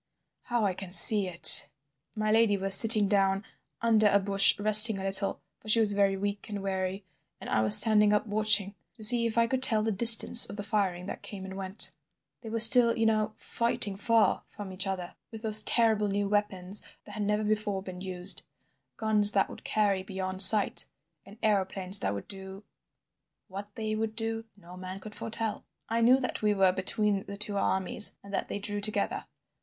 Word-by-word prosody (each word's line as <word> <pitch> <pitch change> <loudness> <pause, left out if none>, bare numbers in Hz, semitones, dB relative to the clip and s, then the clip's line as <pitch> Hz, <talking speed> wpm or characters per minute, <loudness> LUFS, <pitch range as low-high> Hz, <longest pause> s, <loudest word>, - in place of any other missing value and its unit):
How 240 -3 -5
I 195 - -4
can 185 0 -12
see 195 +2 +8
it! 170 -2 +4 0.5
My 215 0 -5
lady 220 -2 -1
was 195 0 +2
sitting 215 0 +4
down 195 0 -3 0.4
under 220 -2 -1
a 200 - 0
bush 195 0 +1
resting 215 +1 +8
a 190 - -10
little, 195 +1 0 0.2
for 215 - -15
she 230 - +1
was 210 -2 +2
very 200 -1 -3
weak 205 +2 -8
and 205 -2 -9
weary, 190 0 -7 0.3
and - - -13
I 110 - -3
was 110 0 +8
standing 210 -1 +4
up 210 +1 -3
watching 210 -2 -1 0.2
to 225 - -16
see 235 +2 +4
if 230 - -9
I 230 - 0
could 260 +2 -6
tell 220 -4 +2
the 220 - -4
distance 230 +3 +6
of - - -12
the 205 - -10
firing 195 -4 -6
that - - -11
came 195 -2 -13
and 190 0 -12
went. 190 +1 -4 0.5
They 225 - -12
were 230 +1 -6
still, 235 +1 +7
you 225 - -3
know, 215 -1 -4
fighting 230 -4 -5
far 225 +2 -2
from 205 -2 -13
each 185 +1 -1
other, 185 -2 -8 0.2
with 225 -1 -14
those 215 -1 +3
terrible 220 -2 -1
new 200 0 -5
weapons 200 -2 -5 0.2
that 210 - -17
had 210 - -10
never 210 +1 -4
before 210 -2 -6
been 185 -1 -13
used: 185 0 -4 0.6
guns 210 -2 0
that 195 - -3
would - - -16
carry 205 -3 -4
beyond 190 -1 -5
sight, 200 +2 +5 0.4
and 205 +2 -18
aeroplanes 195 -2 +1
that 100 - -6
would 100 - -12
do—What 195 +1 -17
they 215 -1 -7
would 220 0 -7
do 225 0 -8
no 180 -2 -18
man 185 +1 -12
could 210 +2 -15
foretell. 225 0 -7 0.3
"I 230 +1 -4
knew 250 +3 +1
that 255 - -7
we 210 -1 -3
were 190 -2 0
between 195 +2 -5
the 200 - -12
two 210 0 -7
armies, 190 +1 -2
and 200 0 -16
that - - -6
they - - -9
drew 205 0 -8
together. 215 +1 -6
205 Hz, 195 wpm, -24 LUFS, 195-215 Hz, 0.6 s, see